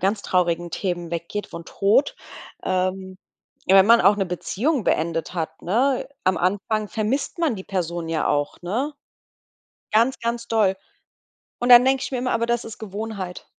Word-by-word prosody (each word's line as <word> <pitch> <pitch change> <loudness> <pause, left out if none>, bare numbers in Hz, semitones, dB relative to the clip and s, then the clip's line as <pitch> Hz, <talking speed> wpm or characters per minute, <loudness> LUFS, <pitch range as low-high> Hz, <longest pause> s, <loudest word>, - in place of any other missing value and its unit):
ganz 200 +2 0
traurigen 175 -1 0
Themen 175 -2 -3
weggeht, 170 +5 -4
von 170 0 -9
Tod, 205 - +2 0.5
ähm, 185 0 -2 0.5
ja, 190 - +6
wenn 195 +1 +7
man 235 0 +7
auch 200 +3 +5
'ne 195 - -1
Beziehung 230 - -1
beendet 165 +2 -1
hat, 160 -2 -4
ne? 250 +10 +1 0.2
Am 185 -1 +2
Anfang 205 +4 -1
vermisst 240 +10 -2
man 325 -8 +1
die 190 -2 -8
Person 175 -3 -3
ja 165 -1 -1
auch, 145 0 -1
ne? 240 +12 -2 1.0
Ganz, 230 +5 +3
ganz 235 0 -3
doll. 215 -5 +2 0.8
Und 245 - 0
dann 245 0 +9
denke 265 0 +2
ich - - -4
mir 255 - -2
immer: 250 +1 -1
„Aber 230 0 0
das 235 0 0
ist 225 - -9
Gewohnheit.“ 205 -3 -6
200 Hz, 170 wpm, -23 LUFS, 180-235 Hz, 1.0 s, dann